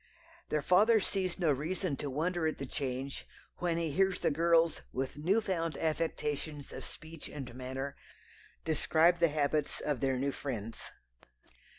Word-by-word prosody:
Their 150 -1 0
father 215 +7 +6
sees 185 -2 -1
no 170 -5 +3
reason 160 +3 -1
to 145 - -3
wonder 160 +4 0
at 155 - -1
the 135 - -4
change 135 0 -3 0.3
when 170 -2 +1
he 165 -2 0
hears 190 +4 +3
the - - +1
girls, 165 +2 +3
with 130 +1 -2
new 175 +9 +2
found 165 -6 -1
affectations 155 -2 -2
of - - -6
speech 160 0 -9
and 135 -5 -7
manner, 130 +2 -4 0.7
describe 160 +2 +4
the 170 - +6
habits 150 0 0
of 145 -4 -1
their 135 -1 +1
new 140 +2 0
friends. 115 -6 -5
155 Hz, 155 wpm, -32 LUFS, 140-170 Hz, 0.7 s, father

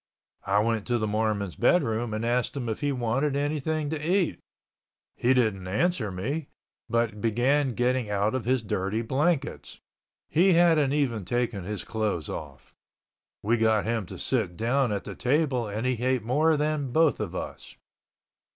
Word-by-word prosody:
I 100 +1 +2
went 110 -1 -1
to 120 -1 +1
the 110 - -1
Mormon's 105 -3 -1
bedroom 120 -5 +2
and 110 +2 -2
asked 125 +3 0
him 125 -3 -3
if 110 - -3
he 145 -1 +1
wanted 135 +3 0
anything 150 +1 -1
to 155 -2 -3
eat. 180 +2 +1 0.8
He 120 - +1
didn't 105 -7 +1
answer 110 - 0
me, 135 - -3 0.4
but 115 -3 0
began 125 +4 +1
getting 125 -2 0
out 105 +2 +1
of 130 -3 -1
his 130 -1 +1
dirty 100 +2 -1
blankets. 140 +5 -1 0.5
He 180 +4 +4
hadn't 165 -5 +4
even 125 -8 0
taken 115 -2 -2
his 105 +1 -4
clothes 105 - -2
off. - - -8 0.7
We 115 +3 +2
got 110 -2 +2
him 110 -4 -1
to - - -8
sit 105 -10 -1
down 120 +2 +1
at 100 -1 -2
the - - -7
table 130 -3 +1
and 105 +4 -3
he 125 -2 -1
ate 130 -3 +1
more 150 +7 +2
than 150 -3 -1
both 160 +2 +3
of 95 -4 -4
us. - - -6
120 Hz, 165 wpm, -27 LUFS, 110-145 Hz, 0.8 s, He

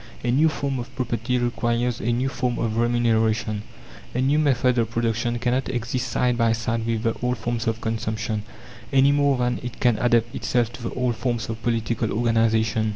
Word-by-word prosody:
A 120 - +1
new 150 +6 +4
form 140 -3 -2
of 125 +2 -8
property 125 -1 -1
requires 120 0 0
a 120 - 0
new 125 +3 0
form 125 -2 -1
of 110 -1 -1
remuneration. 115 -2 +1 0.5
A - - 0
new 140 +3 +3
method 125 -4 +2
of 115 -2 +1
production 115 +1 -1
cannot 125 +2 0
exist 125 +1 -2
side 125 0 0
by 115 -1 +3
side 115 0 -2
with 115 -1 -1
the 115 -2 +1
old 125 0 0
forms 115 0 -3
of 115 0 -1
consumption, 110 -1 -2 0.5
any 135 0 +5
more 145 -1 +3
than 125 0 0
it 120 -1 -7
can 120 -4 +2
adapt 120 -1 +2
itself 120 -1 0
to - - -10
the 115 - -4
old 125 -2 0
forms 120 -2 -2
of 115 0 -5
political 115 -1 -1
organization. 110 -1 +2
120 Hz, 190 wpm, -24 LUFS, 115-125 Hz, 0.5 s, any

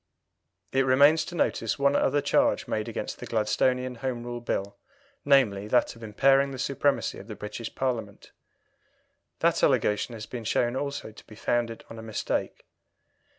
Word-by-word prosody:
It 135 0 +3
remains 140 +5 +5
to 175 - -8
notice 170 - 0
one 140 0 +3
other 145 +1 +2
charge - - +2
made - - -2
against - - -5
the - - -7
Gladstonian 125 +3 0
Home 125 -1 -3
Rule 120 0 -5
Bill, 100 -4 -3 0.5
namely, 110 -8 +3
that 120 +2 +2
of 115 - -15
impairing 135 +6 +3
the 135 - -7
supremacy 140 +2 0
of - - -12
the 110 - -7
British 105 +2 -7
Parliament. 115 -6 -3 1.1
That - - +2
allegation 105 +3 +2
has 110 -1 -7
been 120 -2 -7
shown 120 +3 +1
also 140 -4 -4
to 105 - -16
be 110 - -13
founded 115 +1 -1
on 115 - -10
a - - -7
mistake. 110 -1 -3
120 Hz, 160 wpm, -27 LUFS, 110-135 Hz, 1.1 s, remains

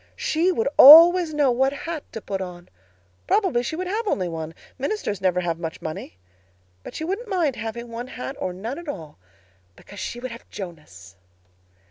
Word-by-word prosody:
She 335 +4 +1
would 230 -10 -1
always 335 +4 +9
know 290 -4 +2
what 265 +3 +2
hat 315 +1 -5
to 225 - -7
put 195 -2 -4
on. 175 -1 -8 0.6
Probably 380 - +2
she 245 +6 -4
would 365 +3 -4
have 425 +5 -3
only 185 - 0
one. 160 -1 -6 0.2
Ministers 270 - -3
never 180 -1 +1
have 170 -2 -2
much 165 -1 -6
money. 155 - -7 0.6
But - - -11
she - - -4
wouldn't 395 +8 -4
mind 345 - 0
having 225 +2 -6
one 235 +2 -6
hat 265 +1 -7
or 185 - -2
none 225 - -6
at 345 - -12
all, 160 - -8 0.6
because 205 - -13
she 240 - -5
would 255 0 -6
have 235 - -12
Jonas. 95 - -10
240 Hz, 180 wpm, -23 LUFS, -, 0.6 s, always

